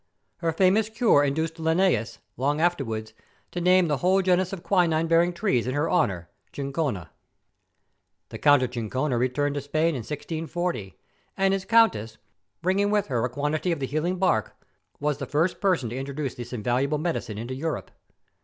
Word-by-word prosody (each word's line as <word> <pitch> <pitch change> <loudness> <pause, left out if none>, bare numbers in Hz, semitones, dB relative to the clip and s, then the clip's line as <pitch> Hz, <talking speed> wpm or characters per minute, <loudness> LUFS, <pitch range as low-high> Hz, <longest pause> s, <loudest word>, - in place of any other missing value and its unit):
Her 165 -1 -1
famous 195 +6 +3
cure 220 - +3
induced 160 +4 -1
Linneus, 160 - +1 0.2
long 145 +4 0
afterwards, 115 -11 -1 0.4
to 175 - -4
name 180 0 +4
the 150 -2 0
whole 190 +5 +2
genus 185 0 +2
of 190 -3 -6
quinine 165 -4 +2
yielding 170 +2 +3
trees 170 - 0
in 130 - -2
her 150 +3 0
honour, 95 - +1
' - - -43
Chinchona.' 135 - -3 1.2
The - - -8
Count 145 -2 +5
of 125 - -2
Chinchon 130 +4 -2
returned 130 +4 0
to 145 - -3
Spain 155 +4 +1
in 145 -6 -2
1640, 155 - -4 0.4
and 195 0 +3
his 195 -1 -2
Countess, 195 - +3 0.5
bringing 195 +3 +2
with 205 -4 +1
her 120 -3 0
a 125 - 0
quantity 150 +7 -1
of 165 - -1
the 135 - -1
healing 155 +7 -1
bark, 180 - +1 0.4
was 145 -1 -1
the 140 - -4
first 160 +5 0
person 180 - +1
to - - -4
introduce 135 0 -4
this 120 0 -8
invaluable 125 +5 0
medicine 150 -9 -3
into 120 +4 -5
Europe. 155 +4 -4
150 Hz, 170 wpm, -25 LUFS, 130-180 Hz, 1.2 s, Count